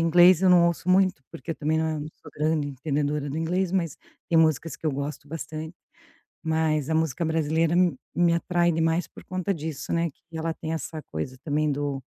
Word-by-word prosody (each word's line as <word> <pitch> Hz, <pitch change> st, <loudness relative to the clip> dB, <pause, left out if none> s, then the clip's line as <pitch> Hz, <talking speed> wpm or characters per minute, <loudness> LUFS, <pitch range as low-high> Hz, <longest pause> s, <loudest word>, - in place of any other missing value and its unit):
inglês 175 Hz, +1 st, +7 dB
eu 190 Hz, -, +5 dB
não 175 Hz, -1 st, +7 dB
ouço 170 Hz, +1 st, -2 dB
muito, 185 Hz, -5 st, +3 dB
porque 150 Hz, -, -8 dB
eu -, -, -8 dB
também 155 Hz, +2 st, 0 dB
não 160 Hz, -1 st, -1 dB, 0.2 s
sou -, -, -14 dB
grande 155 Hz, 0 st, +1 dB
entendedora 145 Hz, +1 st, -2 dB
do 145 Hz, -, -4 dB
inglês, 180 Hz, +3 st, 0 dB
mas 170 Hz, -5 st, 0 dB, 0.3 s
tem 165 Hz, -, +4 dB
músicas 160 Hz, 0 st, +2 dB
que 160 Hz, -, -5 dB
eu -, -, +3 dB
gosto 140 Hz, +1 st, -5 dB
bastante, 160 Hz, +1 st, -6 dB, 0.7 s
mas 160 Hz, -2 st, +1 dB
a 160 Hz, -, +1 dB
música 160 Hz, 0 st, 0 dB
brasileira 160 Hz, +1 st, +1 dB
me 180 Hz, -1 st, +3 dB, 0.2 s
me 170 Hz, 0 st, +4 dB
atrai 175 Hz, 0 st, +2 dB
demais 165 Hz, +2 st, +1 dB
por -, -, -14 dB
conta 185 Hz, +1 st, -1 dB
disso, 155 Hz, -4 st, -5 dB
né, 170 Hz, 0 st, +1 dB
que -, -, -39 dB, 0.2 s
ela 160 Hz, 0 st, -1 dB
tem 160 Hz, 0 st, -5 dB
essa 160 Hz, -1 st, -5 dB
coisa 105 Hz, +12 st, -4 dB
também 150 Hz, 0 st, +1 dB
do 140 Hz, -1 st, -2 dB
160 Hz, 200 wpm, -26 LUFS, 150-170 Hz, 0.7 s, inglês